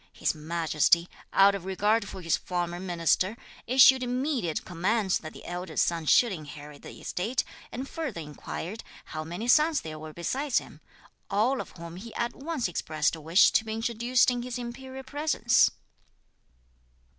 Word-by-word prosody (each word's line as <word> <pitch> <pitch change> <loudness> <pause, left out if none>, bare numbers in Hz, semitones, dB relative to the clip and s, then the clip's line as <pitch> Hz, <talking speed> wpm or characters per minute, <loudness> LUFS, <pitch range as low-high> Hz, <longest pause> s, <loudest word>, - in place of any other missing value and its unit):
His - - 0
Majesty, 165 +1 +2 0.2
out 195 +1 +6
of 200 -3 -4
regard 205 +3 +1
for 190 - -8
his 165 - +2
former 175 -1 -3
minister, 185 +3 +1 0.3
issued 260 +1 +7
immediate 250 - -1
commands 190 +3 0
that 155 - -8
the - - -13
elder 180 +1 -6
son 165 -2 +1
should 240 +7 +5
inherit 150 -3 -9
the - - -11
estate, 225 +8 -1 0.3
and 260 +3 -5
further 295 - -4
inquired 165 +6 -6 0.2
how 155 0 -5
many 175 +8 -5
sons 305 +4 +4
there 155 -1 -7
were 155 0 -8
besides 255 - -1
him, - - -4 0.5
all 225 +7 +2
of - - -11
whom 170 0 -8
he 225 +4 -10
at 235 0 -1
once 290 -4 -2
expressed 155 -3 -1
a 160 - -10
wish 165 +6 +5
to - - +3
be 220 -1 -4
introduced 235 +2 +2
in 245 -1 -2
his 250 0 -4
imperial 260 +2 -7
presence. 285 -3 +3
200 Hz, 160 wpm, -28 LUFS, 170-245 Hz, 0.5 s, issued